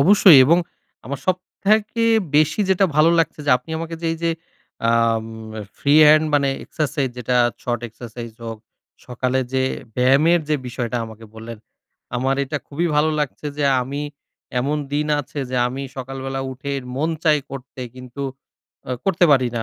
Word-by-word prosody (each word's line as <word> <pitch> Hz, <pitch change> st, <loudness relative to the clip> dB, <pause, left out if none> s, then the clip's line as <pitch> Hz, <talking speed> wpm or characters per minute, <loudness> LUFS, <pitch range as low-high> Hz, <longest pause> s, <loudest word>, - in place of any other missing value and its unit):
অবশ্যই। 185 Hz, -1 st, +8 dB
এবং 170 Hz, +5 st, +5 dB, 0.5 s
আমার 140 Hz, +1 st, -5 dB
সবথেকে 205 Hz, +5 st, 0 dB, 0.3 s
বেশি 155 Hz, +6 st, +3 dB
যেটা 190 Hz, +1 st, +4 dB
ভালো 155 Hz, +2 st, +6 dB
লাগছে 165 Hz, -, 0 dB
যে, -, -, +3 dB
আপনি 125 Hz, +6 st, -15 dB
আমাকে 165 Hz, 0 st, -5 dB
যে 165 Hz, -, -1 dB
এইযে, 165 Hz, 0 st, -1 dB, 0.6 s
আম 115 Hz, -1 st, +2 dB, 0.5 s
ফ্রি 145 Hz, +1 st, +2 dB
হ্যান্ড 155 Hz, +1 st, +6 dB
মানে 140 Hz, -1 st, +3 dB, 0.2 s
এক্সারসাইজ 145 Hz, -3 st, -1 dB
যেটা 125 Hz, +1 st, 0 dB, 0.3 s
শর্ট 120 Hz, -1 st, -2 dB
এক্সারসাইজ 115 Hz, 0 st, -9 dB
হোক, 115 Hz, -1 st, -6 dB, 0.5 s
সকালে 125 Hz, +1 st, -1 dB
যে 130 Hz, 0 st, +2 dB, 0.3 s
ব্যায়ামের 140 Hz, +7 st, +4 dB
যে 155 Hz, -, +2 dB
বিষয়টা 120 Hz, 0 st, -3 dB
আমাকে 110 Hz, 0 st, -11 dB
বললেন। 115 Hz, 0 st, -8 dB, 0.6 s
আমার 130 Hz, +2 st, +1 dB
এটা 145 Hz, +2 st, -3 dB
খুবই 165 Hz, +5 st, -1 dB
ভালো 155 Hz, +1 st, +3 dB
লাগছে 150 Hz, +1 st, -3 dB
যে, 145 Hz, -, +1 dB, 0.2 s
আমি 140 Hz, +3 st, -4 dB, 0.6 s
এমন 145 Hz, +4 st, 0 dB, 0.2 s
দিন 150 Hz, +1 st, 0 dB
আছে 145 Hz, +2 st, -9 dB
যে, 130 Hz, -, -1 dB
আমি 135 Hz, +2 st, -5 dB
সকালবেলা 135 Hz, +1 st, -5 dB
উঠে 135 Hz, +2 st, -6 dB, 0.3 s
মন 155 Hz, +4 st, 0 dB
চায় 150 Hz, -2 st, +4 dB
করতে 135 Hz, -1 st, -9 dB
কিন্তু 125 Hz, +2 st, -8 dB, 0.7 s
আ -, -, -4 dB
করতে 185 Hz, -2 st, +3 dB
পারি 130 Hz, -3 st, +3 dB
না 115 Hz, -, -1 dB
140 Hz, 155 wpm, -21 LUFS, 125-155 Hz, 0.7 s, অবশ্যই